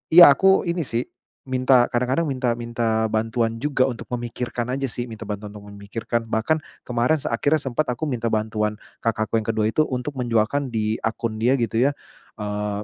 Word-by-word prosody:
iya, 175 -4 +11
aku 190 +7 +4
ini 170 -4 -1
sih, 115 +1 0 0.4
minta 130 -1 +4
kadang-kadang 130 +7 0
minta 130 -3 0
minta 115 -2 0
bantuan 115 +1 0
juga 130 +1 +1
untuk 120 -3 -5
memikirkan 120 0 -3
aja 135 +2 -2
sih, 125 -1 -3
minta 110 -2 -8
bantuan 105 0 -5
untuk 105 0 -11
memikirkan. 115 +3 -4
Bahkan, 115 +9 +1 0.2
kemarin 125 +5 +1
se - - -2
akhirnya 145 +2 +2
sempet 135 +3 -1
aku 125 +5 -3
minta 125 -6 -1
bantuan 110 -1 0 0.2
kakakku 115 -1 0
yang 110 - -7
ke-2 110 -1 +1
itu, - - -3
untuk 125 +3 -3
menjualkan 120 +3 +1
di 110 -2 -1
akun 110 0 -2
dia 125 +4 +3
gitu 115 -3 0
ya, 145 - -1 0.4
eee, 105 -1 -3
120 Hz, 180 wpm, -23 LUFS, 110-130 Hz, 0.4 s, iya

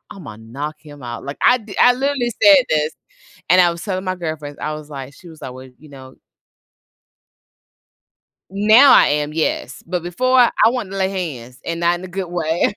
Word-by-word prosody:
"Imma 125 - -11
knock 140 +7 -7
him 145 -3 -14
out." 120 0 -7
Like, 140 - -7
I 250 - +5
d 210 -2 -11
I 245 - +6
literally 265 -2 -1
said 290 -4 +6
this, 155 0 0 0.6
and 180 +1 +5
I 175 -1 +3
was 170 0 -8
telling 190 -2 -3
my 185 0 -2
girlfriends. 155 -4 -6
I 155 - -3
was 150 0 -9
like 135 -1 -8
she 180 - -16
was 160 - -15
alway 130 0 -10
you 155 -1 -17
know 130 -1 -13 2.4
Now 215 +7 +6
I - - +6
am, 150 +1 -1
yes, 160 0 -3
but 175 0 -3
before, 255 +9 +1
I 245 - +5 0.2
want 235 -6 -3
to - - -5
lay 190 -1 0
hands 135 -10 -6
and 170 0 -4
not 175 0 +1
in 185 - -10
a - - -8
good 185 0 -5
way. 170 +2 -1
170 Hz, 195 wpm, -19 LUFS, 145-195 Hz, 2.4 s, I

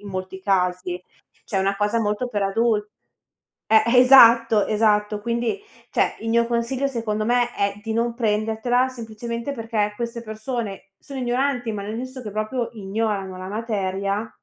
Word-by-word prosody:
in 205 - -10
molti 190 0 -5
casi, 180 -2 0 0.4
cioè 195 - -2
una 195 +1 +1
cosa 210 +3 +1
molto 210 +3 -1
per 205 -4 -2
adul 210 +1 +1 0.9
eh 220 0 +7 0.2
esatto, 230 -4 +7
esatto, 210 -1 +2
quindi 235 - -1 0.3
cioè, - - +1
il 225 - -4
mio 235 +1 +3
consiglio 240 +3 0
secondo 220 -4 -2
me 240 +1 +1
è 200 0 0
di 225 - -2
non 235 +1 0
prendertela 225 +2 +1
semplicemente 235 +1 -5
perché 225 -4 -1
queste 235 +1 -5
persone 220 -2 -5
sono 275 -2 -8
ignoranti, 245 0 0
ma 210 -2 -4
nel 210 +2 -5
senso 255 +2 -6
che 215 -4 -7
proprio 215 +3 -2
ignorano 200 -2 -3
la 185 - -7
materia 200 -1 -2
220 Hz, 155 wpm, -23 LUFS, 205-235 Hz, 0.9 s, eh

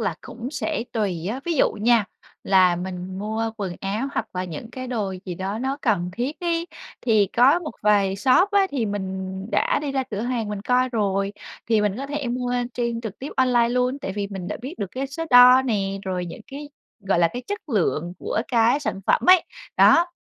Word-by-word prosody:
là 200 - -1
cũng 240 +1 -7
sẽ 305 -3 -2
tùy 190 -7 -2
á, 255 +4 -4
ví 345 - -1
dụ 285 - +3
nha, 225 +1 +3 0.4
là 185 -2 +4
mình 185 +1 -5
mua 220 +2 -2
quần 190 -4 -4
áo 210 +7 -2
hoặc 220 - -2
là 180 0 -2
những 180 +6 -7
cái 255 +1 -6
đồ 210 -6 -2
gì 180 - -5
đó 190 +4 -4
nó 265 +3 -2
cần 185 -7 +1
thiết 250 - -3
ấy 340 -1 -1 0.3
thì 215 -4 +3
có 265 +7 +6
một 325 -4 -6
vài 200 -2 +3
shop 270 - +4
á, 400 -1 +4
thì 255 -6 -1
mình 190 -1 -4
đã - - +2
đi 285 -2 -3
ra 270 - 0
cửa 210 -1 -3
hàng 235 -2 -2
mình 210 -1 -4
coi 250 +3 +2
rồi, 200 -4 0 0.3
thì 225 -2 +3
mình 210 -1 0
có 275 +3 -5
thể 285 -1 -3
mua 245 0 -2 0.2
trên 235 -1 -2
trực 220 -3 -7
tiếp 270 - -6
online 245 -3 +3
luôn 250 +2 0
tại 195 - -5
vì 200 0 -3
mình 190 -3 -5
đã 210 - -3
biết 270 +7 -6
được 195 - -4
cái 270 +2 -3
số 305 +5 -5
đo 250 +1 +8
nè, 195 -6 -1
rồi 180 -2 -2
những 170 - -9
cái 290 +2 -8 0.3
gọi 195 -3 0
là 170 -1 +4
cái 245 - -5
chất 410 -3 -5
lượng 175 - 0
của - - -2
cái 240 +3 +3
sản 230 -9 -3
phẩm - - +3
ấy, 365 -2 +7 0.3
đó, 340 +1 +6
225 Hz, 220 wpm, -23 LUFS, 195-260 Hz, 0.4 s, đo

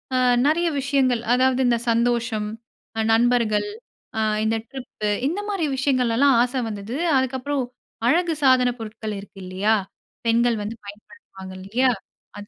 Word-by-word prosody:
அ - - +3 0.3
நிறைய 340 +3 +2
விஷயங்கள். 265 -4 +1
அதாவது 260 +1 +3
இந்த 235 - +3
சந்தோஷம், 230 -2 +1 0.5
அ - - +3
நண்பர்கள், 235 - +2 0.5
அ - - +1 0.2
இந்த 220 +1 +1
ட்ரிப்பு, 250 -5 -5 0.2
இந்தமாரி 395 0 -2
விஷயங்கள்லாம் 260 -1 +3
ஆசை 250 +2 0
வந்தது. 210 +3 -6 0.2
அதுக்கப்புறம் 260 +1 -1 0.4
அழகு 340 +4 +3
சாதனப் 250 -2 +4
பொருட்கள் 215 -1 -6
இருக்கு 195 0 -13
இல்லயா! 195 +4 +1 0.5
பெண்கள் 230 0 +3
வந்து 220 +3 -5
பயன்படுத்துவாங்க 200 - -12
இல்லயா! 240 +7 +1 0.5
அது 205 - -10
245 Hz, 125 wpm, -23 LUFS, 220-265 Hz, 0.5 s, சாதனப்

